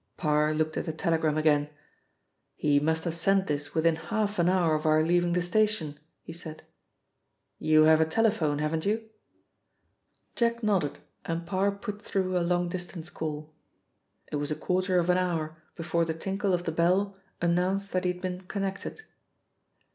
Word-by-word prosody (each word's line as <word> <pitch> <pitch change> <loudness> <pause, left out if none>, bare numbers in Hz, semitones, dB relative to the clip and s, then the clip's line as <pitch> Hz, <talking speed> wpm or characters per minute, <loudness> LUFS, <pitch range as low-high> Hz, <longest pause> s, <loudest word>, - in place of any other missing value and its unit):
Parr 150 -1 +2
looked 155 0 -1
at - - -2
the 160 - -2
telegram 160 -1 0
again. 150 -1 +3 0.9
"He 145 -1 +3
must 160 +2 +1
have 170 - -2
sent 190 +3 +2
this 145 -1 -3
within 160 0 +3
half 205 +5 -2
an 170 +1 +4
hour 180 -4 +3
of 155 +1 0
our 155 0 +4
leaving 175 +1 +2
the 180 0 +1
station," 180 -6 0 0.2
he 165 - -8
said. 160 -2 -8 1.0
"You 155 0 +5
have 160 0 +6
a - - +5
telephone, 160 -5 +1
haven't 155 +2 -1
you?" 220 +2 -1 1.3
Jack 235 0 0
nodded, 190 -9 +1 0.3
and 165 0 -3
Parr 190 +3 +1
put 205 +1 -6
through 185 -4 -1
a - - +3
long 175 +1 +1
distance 175 -1 -6
call. 155 -1 -5 0.8
It 150 - -1
was 145 0 -2
a 155 - -1
quarter 185 +2 0
of 175 0 +3
an 180 - +3
hour 160 -3 -2 0.2
before 170 0 0
the 160 -1 -2
tinkle 195 +3 -2
of 175 - -4
the 165 - -2
bell 185 +5 +2 0.2
announced 180 +3 0
that 185 - 0
he 180 - +2
had 180 0 -9
been 180 0 -3
connected. 195 - -4
170 Hz, 170 wpm, -28 LUFS, 155-190 Hz, 1.3 s, have